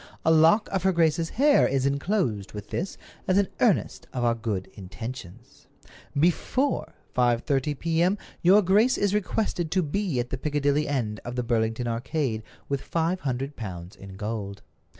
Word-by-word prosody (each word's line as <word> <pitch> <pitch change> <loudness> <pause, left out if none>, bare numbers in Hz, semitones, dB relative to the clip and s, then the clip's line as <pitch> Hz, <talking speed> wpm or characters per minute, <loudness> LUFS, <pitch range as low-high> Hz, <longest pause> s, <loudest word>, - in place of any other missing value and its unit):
A 160 - +5
lock 160 +7 +5
of 195 - 0
her 190 - +3
grace's 165 -1 +2
hair 285 +3 +4
is 135 0 0
inclosed 140 - -1
with 105 -1 -8
this 185 +4 -3 0.3
as 185 - +3
an 200 -1 +3
earnest 220 -7 +1
of 125 -2 -2
our 120 -1 +3
good 110 -5 -3
intentions. 115 +3 -9 0.5
"Before 215 - +1 0.2
5:30 130 +4 +1
p.m. 170 +5 +1 0.2
your 195 +4 +6
grace 210 +7 +4
is 200 -1 +1
requested 205 -4 -1
to 185 +2 +1
be 165 -2 -1
at 120 0 -3
the 130 - -3
Piccadilly 145 0 +1
end 115 -7 -2
of 120 +1 -6
the 125 - -1
Burlington 115 0 0
Arcade 120 0 -1 0.3
with 140 -1 -1
five 170 +2 -1
hundred 135 -1 -3
pounds 90 -3 -7
in 95 -1 -11
gold. 100 -1 -5
140 Hz, 160 wpm, -26 LUFS, 115-175 Hz, 0.5 s, your